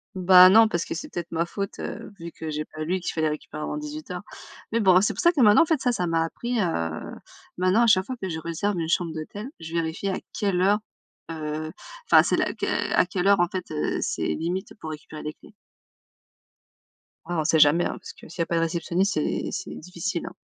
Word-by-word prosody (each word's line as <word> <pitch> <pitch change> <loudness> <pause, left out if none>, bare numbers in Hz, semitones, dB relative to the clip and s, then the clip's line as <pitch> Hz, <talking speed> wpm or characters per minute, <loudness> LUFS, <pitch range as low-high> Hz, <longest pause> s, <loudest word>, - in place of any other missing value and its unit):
Bah 185 0 +8
non 220 +3 +7
parce 170 -6 -1
que - - -5
c'était 170 +1 -5
de 170 - -15
ma 170 0 0
faute, 195 +3 -5
heu, 225 +1 -6
vu 170 0 -7
que 160 - -6
j'ai 150 0 -3
pas 155 0 -7
lu 180 +4 -1
qu'il 175 - -4
fallait 160 -1 +1
récupérer 150 0 -6
avant - - -3
18:00. 300 +1 -6 0.5
Mais 230 - +2
bon 185 -3 +6
c'est 205 - +1
pour - - -3
ça 345 -1 +5
que 330 - -3
maintenant 210 -1 +7
en - - +5
fait 320 -3 +1
ça, 245 - +1
ça 180 -5 -1
m'a 165 -1 +1
appris, 240 +8 -3
heu, 85 - -2 0.4
maintenant 185 +6 +3
à - - +4
chaque 190 -4 +4
fois 255 +3 -5
que 190 - -2
je 165 -3 -4
réserve 175 +5 -2
une 165 -1 -2
chambre 170 -2 0
d'hôtel. 180 +8 -6
Je 165 0 -8
vérifie 165 +3 -2
à 190 - -1 0.2
quelle 195 -3 +1
heure, 200 +3 +4 0.5
heu 155 0 -4 0.4
enfin - - +7
c'est - - +1
la - - 0
que, - - -2
à - - +4
quelle 180 +1 -2
heure 200 -1 +5
en 175 - +4
fait, 180 -1 -6
heu, 150 - -1
c'est - - -2
limite 175 - -2
pour 160 - -6
récupérer 155 0 -8
les 150 - -4
clés. - - -18 1.7
Ouais. 175 - -3
On 160 - +1
sait 160 +1 +3
jamais, 150 +4 +5
hein. - - -3
Parce - - -10
que - - -15
s'il 170 +3 -13
y - - +3
a - - -4
pas 170 - -2
de 165 - +2
réceptionniste, 170 +4 0
c'est - - -1
c'est 380 - -5
difficile, 180 +1 -4
hein. 175 - -7
175 Hz, 240 wpm, -25 LUFS, 160-200 Hz, 1.7 s, Bah